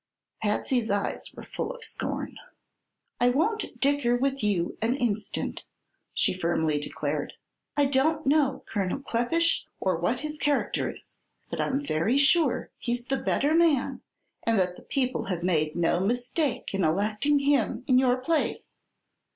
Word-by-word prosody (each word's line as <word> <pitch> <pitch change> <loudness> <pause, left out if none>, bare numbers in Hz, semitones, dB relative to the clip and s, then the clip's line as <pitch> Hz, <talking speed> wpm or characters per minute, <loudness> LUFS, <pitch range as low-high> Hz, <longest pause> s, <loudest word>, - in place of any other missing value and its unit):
Patsy's 220 +2 0
eyes 200 0 -2
were - - -10
full - - -4
of - - -9
scorn. - - -3 0.8
"I 245 0 +4
won't 410 - 0
dicker 275 -4 +2
with 275 0 -1
you 190 -5 0
an 230 +3 +2
instant," 225 -5 -2 0.5
she - - +2
firmly 160 -4 0
declared. 145 - -3 0.4
"I 290 - +5
don't 290 +3 +2
know 275 -1 +2
Colonel 195 -1 -1
Kleppish, 275 +6 +1 0.2
or 185 -2 +1
what 235 +9 0
his 305 0 -5
character 290 0 +1
is, - - -11 0.3
but - - -1
I'm 280 +2 -1
very 170 - +1
sure 290 -1 +3
he's 240 0 -2
the 270 +1 0
better 290 +3 +1
man 320 -5 +3 0.4
and 230 -1 +1
that 180 -1 +1
the - - -13
people 255 -2 -1
have 180 -3 -3
made 155 -4 +1
no 170 0 +2
mistake 245 - -1
in 195 -1 0
electing 210 - +2
him 275 -4 +1
in 255 -1 +5
your 255 -1 +3
place. 305 +5 -1
245 Hz, 150 wpm, -27 LUFS, 200-285 Hz, 0.8 s, I